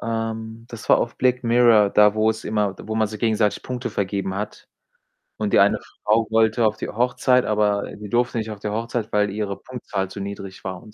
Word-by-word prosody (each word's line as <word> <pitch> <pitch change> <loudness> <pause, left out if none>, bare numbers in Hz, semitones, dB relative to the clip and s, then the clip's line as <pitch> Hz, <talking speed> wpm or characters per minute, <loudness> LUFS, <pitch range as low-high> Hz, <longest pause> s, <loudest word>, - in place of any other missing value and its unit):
ähm, 115 0 -4
das 110 -3 -10
war - - +6
auf 115 - -2
Black 125 0 +1
Mirror, 115 -4 +5
da 105 0 +5
wo 110 0 +3
es 110 0 -6
immer 105 -2 0
wo 110 - -5
man 110 -1 +1
sich 110 0 -7
gegenseitig 110 -2 +1
Punkte 125 0 -4
vergeben 100 -1 -2
hat 105 +2 -6 0.7
und 105 -2 -2
die - - +6
eine - - +4 0.2
Frau 110 +1 +2
wollte 110 +1 +3
auf 105 0 +1
die - - -5
Hochzeit, 125 +2 +2
aber 105 -1 0
die 105 0 -9
durfte 120 +2 +1
nicht 110 -1 -2
auf 105 - -8
die 105 - -4
Hochzeit, 115 +1 -3
weil 105 0 +2
ihre 100 -1 -3
Punktzahl 100 -7 -5
zu 100 - -8
niedrig 100 -1 -7
war 95 -2 -5
und 105 - -15
110 Hz, 215 wpm, -22 LUFS, 105-115 Hz, 0.7 s, war